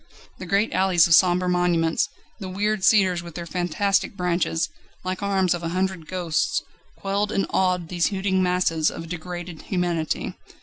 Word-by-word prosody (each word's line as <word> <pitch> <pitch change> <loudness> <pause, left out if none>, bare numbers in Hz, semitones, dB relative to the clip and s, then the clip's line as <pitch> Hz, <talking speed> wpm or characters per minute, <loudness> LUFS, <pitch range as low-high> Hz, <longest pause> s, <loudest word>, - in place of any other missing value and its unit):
The 185 - -7
great 200 +5 +1
alleys 185 -3 +4
of 170 - +3
sombre 180 +2 +5
monuments, 175 -2 +1 0.3
the 190 -3 -6
weird 205 +2 -1
cedars 190 -4 +4
with 170 -2 -11
their 170 - -5
fantastic 185 +4 0
branches, 175 -2 0 0.4
like 185 +1 -3
arms 195 -3 +2
of 175 - -4
a 165 - -3
hundred 185 -4 -2
ghosts, 175 -4 -1 0.3
quelled 200 +1 -1
and 195 - +1
awed 180 -3 +1
these 175 -2 +1
hooting 190 -1 0
masses 180 -3 +2
of 165 - -7
degraded 175 -1 -6
humanity. 175 -4 -2
180 Hz, 160 wpm, -24 LUFS, 170-190 Hz, 0.4 s, sombre